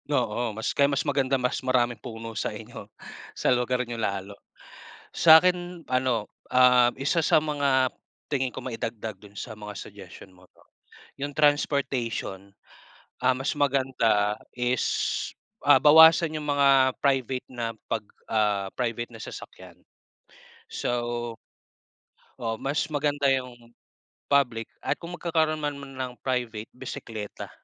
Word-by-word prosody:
Oo, 120 -4 0
mas 110 - -2
kaya 140 0 +3
mas 140 +1 -1
maganda 135 -2 +1
mas 125 -1 -1
maraming 120 -3 +1
puno 115 -2 -7
sa - - -2
inyo, - - -10 0.5
sa - - +3
lugar 125 +1 0
niyo 120 -1 -5
lalo. 100 -1 -3 0.8
Sa'kin 175 +2 +5
ano, 130 -4 0 0.2
um, 125 -1 +6
isa 155 +4 +1
sa 155 - +5
mga 140 -4 +1 0.4
tingin 130 -3 -1
ko - - -6
maidagdag 115 -3 -5
dun 100 +1 -16
sa 105 +1 -7
mga 105 0 -8
suggestion 95 -2 -12
mo 90 - -19
'no, - - -24 0.6
yung 145 0 -4
transportation. 135 -9 0 0.8
Ah, 130 - +5
mas 135 +4 -2
maganda 130 -7 +2 0.2
is 125 0 0 0.8
ah, - - +6
bawasan 160 +1 +7
yung 155 - -5
mga 135 -2 +5
private 130 -2 0
na 120 -2 -4 0.2
pag 110 -2 -2 0.2
ah, 105 -3 +1
private 120 -1 -2
na - - -12
sasakyan. - - -10 0.9
So 120 -1 -2 1.0
oo 115 -3 -3
mas 140 +3 0
maganda 145 -1 0
yung 120 -2 -5 0.6
public 125 -6 +2 0.2
at - - 0
kung 170 +1 -7
magkakaroon 160 -2 +1
man 145 -1 -2
ng 130 -2 -6
private, 120 -4 -2
bisikleta. 115 -5 -7
125 Hz, 130 wpm, -26 LUFS, 115-140 Hz, 1.0 s, bawasan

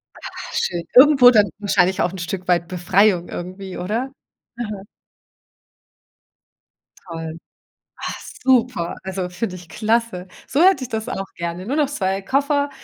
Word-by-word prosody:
Ach, - - -9
schön. 175 -1 -1
Irgendwo 265 -1 +8
dann 205 -4 +4
wahrscheinlich 190 -2 +2
auch 175 - +1
'n 190 - -8
Stück 180 +1 -5
weit 175 -1 +2
Befreiung 180 +1 +2
irgendwie, 185 +2 -7
oder? 225 +9 -2 0.4
Mhm. 210 -4 -6 2.2
Toll. 165 -1 -6 0.6
Ach, - - -5 0.2
super, 245 -9 +2
also, 190 -1 -3
finde 185 +1 -4
ich 175 -2 -13
klasse. 220 -3 -1 0.2
So 280 - 0
hätte 370 -8 +5
ich - - -8
das 220 +1 -3
auch 195 -5 -4
gerne. 170 +1 -4
Nur 260 +8 -2
noch 295 -3 +2
2 195 -8 -1
Koffer 285 +4 +1
195 Hz, 140 wpm, -21 LUFS, 180-245 Hz, 2.2 s, Irgendwo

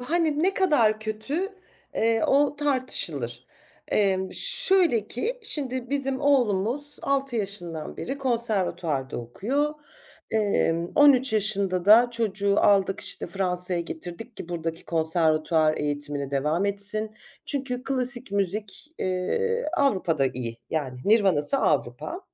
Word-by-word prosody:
b - - -7
hani 315 0 +1
ne 385 +2 +2
kadar 235 - +2
kötü, 220 - -3 0.5
eee, 225 0 +1
o 290 +1 +2
tartışılır. 170 - -2 0.4
Emm, 190 -2 +1
şöyle 370 - +1
ki 465 - -3
şimdi 260 - -4
bizim 270 -1 -1
oğlumuz 265 0 +1
6 275 -2 -1
yaşından 175 -7 -5
beri 275 +2 -5
konservatuvarda 190 - 0
okuyor. 260 - -2 0.6
Emm, 185 -6 +1
13 270 -3 +5
yaşında 200 -4 0
da 230 +4 +7
çocuğu 200 -4 -1
aldık, 195 -1 +3
işte, - - -5
Fransa’ya 180 -2 0
getirdik 175 +8 -8
ki - - -8
buradaki 165 -1 -4
konservatuvar 160 -1 +2
eğitimine 145 -1 -3
devam 150 +6 0
etsin. 205 +2 +4 0.4
Çünkü 260 -3 -3
klasik 255 -4 0
müzik, 205 - -3
eee, 460 - -1
Avrupa’da 180 - +1
iyi. 120 -3 -5
Yani 135 -5 -3
nirvanası 200 - +3
Avrupa. 350 +6 -1
210 Hz, 115 wpm, -25 LUFS, 170-270 Hz, 0.6 s, da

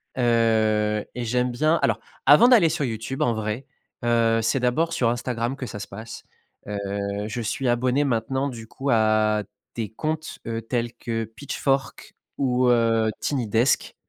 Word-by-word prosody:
heu 110 -3 +2
et 125 -1 -3
j'aime 125 +2 +1
bien 155 +7 +2
alors, 115 -1 +1 0.3
avant 150 - +8
d'aller 225 -10 +6
sur 155 -2 -1
YouTube, 115 +2 -3
en 120 - +2
vrai, 110 +4 -3 0.4
heu, 115 -1 +3
c'est 115 +5 +1
d'abord 155 +7 +1
sur 125 -7 +2
Instagram 120 +1 -2
que 135 - -6
ça 110 -3 -7
se 100 - -6
passe, 110 +3 -9 0.5
heu, 105 0 -3 0.5
je 120 +2 -4
suis 125 +4 -2
abonné 125 +3 +2
maintenant, 130 +1 0
du 115 -4 -8
coup, 135 +5 -5
à 110 -1 +3 0.3
des 110 -3 -4
comptes, 155 +6 -4
heu, 115 0 -3
tels 120 0 -2
que 115 -1 -3
Pitchfork 135 +4 -3 0.2
ou 125 -2 +2
heu, 115 -2 +3
Tiny 130 -6 -1
Desk, 115 +5 +1
120 Hz, 160 wpm, -24 LUFS, 110-135 Hz, 0.5 s, avant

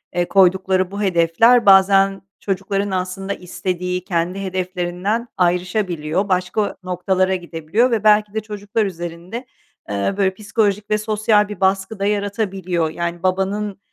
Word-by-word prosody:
eee, 175 0 +1
koydukları 190 -1 +3
bu 200 +1 -5
hedefler 195 +6 +4
bazen 195 0 +5 0.2
çocukların 195 +1 -2
aslında 190 +1 -3
istediği, 180 0 -4
kendi 180 +1 -2
hedeflerinden 185 +4 -2
ayrışabiliyor, 180 -1 0
başka 185 +3 0
noktalara 185 +1 0
gidebiliyor 175 +7 -1
ve 225 -3 0
belki 210 -1 +4
de 220 - 0
çocuklar 210 0 -3
üzerinde, 175 +6 -6 0.4
eee, 100 - -1
böyle, 190 -2 +2
psikolojik 205 0 -1
ve 215 - +2
sosyal 215 -1 +2
bir 205 -3 -7
baskı 190 +2 0
da 200 - 0
yaratabiliyor. 195 -5 -1
Yani, 170 +2 -4
babanın 195 +2 -1
190 Hz, 130 wpm, -20 LUFS, 180-205 Hz, 0.4 s, bazen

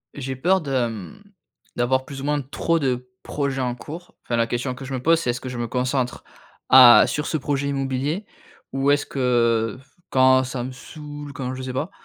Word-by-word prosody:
J'ai 135 -1 -4
peur 180 +8 +2
de, 135 -5 0
mmh, 115 - -9 0.5
d'avoir, 130 +2 +1
plus 135 -1 -8
ou - - -5
moins, 150 0 +1
trop 155 +5 -1
de 125 -3 -2
projets 140 -2 -2
en 125 -1 -1
cours. 165 +8 -10
Enfin, 120 - -1
la 115 0 +2
question 125 +2 -2
que 135 - -9
je 135 - -6
me 130 - -3
pose 165 +4 +4
c'est: 145 - -2
«Est-ce 125 - -6
que 130 - -6
je 125 - -6
me 120 0 -2
concentre 125 +1 -1 0.5
à 125 -2 +9
sur 150 - -2
ce 155 - -1
projet 140 0 -2
immobilier? 140 +7 -2 0.5
Ou 135 +1 +2
est-ce 145 0 +2
que, 115 -4 +1
f 135 - -26 0.2
quand 130 0 +5
ça 130 -1 -4
me 130 - -5
saoule, 145 +2 -9
quand 130 -1 -4
je 130 - -6
sais 130 -1 -5
pas, 145 +7 -2
130 Hz, 215 wpm, -23 LUFS, 125-145 Hz, 0.5 s, à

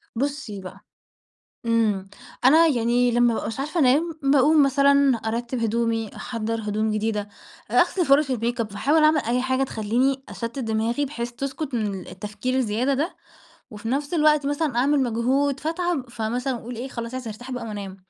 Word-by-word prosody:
بُصّي 275 -6 -3
بقى 185 - -10 0.9
إمم. 215 -4 +1 0.4
أنا 315 +6 +7
يعني 245 -3 +2
لمّا 240 +1 +1
ما 240 -1 +4
بابقاش 225 +4 -4
عارفة 305 +5 -1
أنام، 300 +5 +3
باقوم 285 +2 +5
مثلًا 280 -1 +4
أرتِّب 235 +3 -3
هدومي، 225 -1 -1
أحضّر 230 -1 -3
هدوم 215 +1 -1
جديدة، 210 -1 -1 0.4
آآ - - -5
أغسل 360 -4 +1
فُرَش 275 0 +4
الmakeup، 235 0 -1
باحاول 275 +10 +1
أعمل 305 -1 +5
أي 245 +2 0
حاجة 260 +1 0
تخلّيني 255 +3 0
أشتِّت 230 +2 -6
دماغي 230 +3 0
بحيث 240 -3 -5
تسكُت 270 +2 -4
من 205 -4 -2
التفكير 210 +6 -4
الزيادة 250 +2 +1
ده، 300 +7 -2 0.5
وفي 215 +1 -7
نَفْس 285 +6 -1
الوقت 300 -3 +3
مثلًا 290 -3 -1
أعمل 280 +3 +3
مجهود 260 +4 0
فاتعب، 330 -5 -2
فمثلًا 245 +4 -2
أقول 240 +1 -7
إيه، 250 +3 -5
خلاص 235 -1 -6
عايزة 255 -2 -5
أرتاح 245 +5 -9
بقى 245 -2 -4
وأنام. 200 -3 -6
245 Hz, 160 wpm, -24 LUFS, 225-280 Hz, 0.9 s, أنا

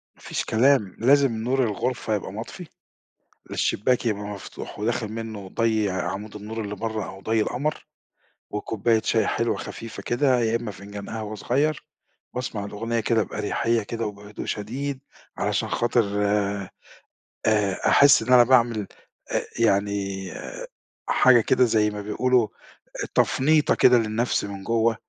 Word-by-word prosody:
ما - - -24
فيش - - -3
كلام 115 -4 +3
لازم 135 +2 +4
نور 130 +2 +1
الغرفة 115 0 -1
يبقى 95 - -4
مطفي، 120 - -7 0.8
الشباك 125 +4 +1
يبقى 105 -2 -1
مفتوح 105 0 -8
وداخل 115 +1 -1
منه 110 -4 -6
ضي 110 -3 +1
عمود 95 +4 -4
النور 110 +2 -5
اللي 105 0 -5
برا 110 +1 -3
أو 95 - -10
ضي 110 +1 +1
القمر، 145 +8 -2 0.6
وكوباية 110 +2 0
شاي 110 -2 +2
حلوة 115 0 0
خفيفة 115 0 -7
كده 125 0 +2
يا 115 0 +1
إمّا 115 -3 -3
فنجان 100 0 -9
قهوة 110 -1 -5
صغير، 140 +8 0 0.5
باسمع 115 -5 -3
الأغنية 115 +3 -2
كده 110 0 +2
بأريحية 110 +3 -1
كده 115 +1 -4
وبهدوء 105 0 -8
شديد 130 +6 -3 0.4
علشان - - -1
خاطر، 120 0 +2 1.4
آآ، 105 -3 +2
أحس 140 -4 +7
إن 125 +3 +2
أنا 120 -1 +9
باعمل 120 -4 +3 0.4
أ - - +1 0.2
يعني 100 -3 0 0.8
حاجة 125 -2 +6
كده 130 +3 +3
زي 110 -2 +2
ما 105 0 -5
بيقولوا 120 +3 +2 0.7
تفنيطة 150 +3 +3
كده 125 -1 +6
للنفس 115 +1 0
من 100 -1 -7
جوا 115 0 +2
110 Hz, 135 wpm, -24 LUFS, 105-120 Hz, 1.4 s, أنا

